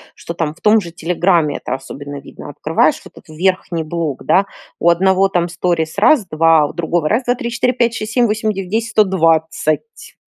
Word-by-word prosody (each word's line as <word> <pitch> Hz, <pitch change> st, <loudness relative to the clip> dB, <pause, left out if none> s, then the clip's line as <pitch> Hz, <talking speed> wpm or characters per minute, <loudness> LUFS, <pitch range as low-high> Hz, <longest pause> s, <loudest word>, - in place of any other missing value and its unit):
что 170 Hz, -, -7 dB
там 160 Hz, -2 st, -3 dB
в -, -, -24 dB
том 215 Hz, +1 st, +5 dB
же 170 Hz, -, -9 dB
"Телеграме" 170 Hz, -2 st, 0 dB
это -, -, -5 dB
особенно 140 Hz, +1 st, -7 dB
видно? -, -, -11 dB
Открываешь -, -, 0 dB
вот -, -, -16 dB
этот -, -, -16 dB
верхний 175 Hz, 0 st, -1 dB
блок, 155 Hz, -3 st, -4 dB
да? 195 Hz, +2 st, +3 dB, 0.3 s
У 170 Hz, -, +3 dB
одного 190 Hz, +2 st, +3 dB
там 175 Hz, -2 st, -1 dB
сторис: 170 Hz, -1 st, -2 dB
раз-два, 165 Hz, -, +3 dB
у -, -, -6 dB
другого: 165 Hz, -1 st, -1 dB
раз, 230 Hz, +4 st, +1 dB
2, 245 Hz, +1 st, +1 dB
3, 235 Hz, -1 st, -5 dB
4, 250 Hz, +1 st, 0 dB
5, 235 Hz, -1 st, +1 dB
6, 215 Hz, +1 st, -5 dB
7, 245 Hz, -2 st, +3 dB
8, 215 Hz, 0 st, 0 dB
9, 190 Hz, -2 st, -6 dB
10, 230 Hz, +1 st, -1 dB
120. 165 Hz, -, 0 dB
175 Hz, 190 wpm, -17 LUFS, 160-215 Hz, 0.3 s, том